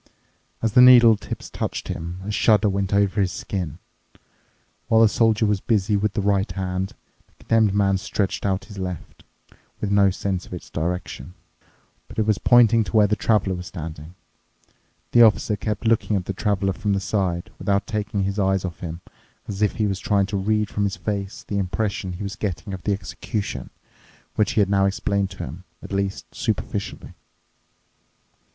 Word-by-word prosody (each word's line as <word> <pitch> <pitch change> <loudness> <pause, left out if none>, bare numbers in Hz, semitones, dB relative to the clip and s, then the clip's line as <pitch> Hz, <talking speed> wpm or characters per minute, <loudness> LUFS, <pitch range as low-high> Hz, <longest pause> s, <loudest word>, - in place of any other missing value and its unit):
As 115 - +2
the 125 - +7
needle 120 -3 +8
tips 105 - -7
touched - - -4
him, 85 +3 -5
a 105 - -3
shudder 105 0 +3
went 100 -1 -1
over 100 0 +2
his 95 -2 +1
skin. 90 -6 -4 1.1
While 110 0 +4
the 115 - +7
Soldier 110 0 +2
was 105 -2 +1
busy 105 -2 +1
with 100 0 0
the 100 - -1
right 100 0 +1
hand, 95 0 -3 0.3
the - - -34
Condemned 110 -3 +3
Man 100 -2 +2
stretched 100 -1 -2
out 95 -1 -1
his 100 -2 -10
left, 90 -2 -6 0.6
with 105 - -2
no 100 -1 +5
sense 95 -1 -3
of - - -7
its 90 - -10
direction. 90 -2 -4 0.7
But - - -13
it 110 - +2
was 105 -2 +1
pointing 115 -2 +5
to 95 - -1
where 105 - +6
the 105 +1 +1
Traveler 105 -3 +1
was 90 -1 -6
standing. 80 -1 -8 1.0
The 120 - +6
Officer 110 -1 +4
kept 105 +2 -4
looking 110 -1 +2
at 95 -2 -1
the 100 - -3
Traveler 95 -1 0
from 100 +4 -1
the 100 - +1
side, 95 -3 -2
without 100 -1 0
taking 105 -1 -2
his 100 +2 -2
eyes 95 -1 +1
off 85 -2 -6
him, 85 0 -6 0.5
as 100 0 -5
if 105 - +2
he 110 - 0
was 95 -2 -1
trying 100 -1 +2
to - - +2
read 105 +2 +1
from 100 - 0
his 95 -2 -2
face 100 +1 -4
the 100 - -1
impression 95 0 -2
he 90 - -6
was 100 0 -4
getting 100 0 -4
of 95 - -6
the 100 - +2
execution, 100 - -4 0.6
which 105 -2 +1
he 110 - +3
had 100 - +2
now 100 -1 +3
explained 100 0 -1
to 95 - -7
him, 80 +8 -8 0.2
at - - -9
least 100 0 -2
superficially. - - -3
100 Hz, 185 wpm, -23 LUFS, 95-105 Hz, 1.1 s, needle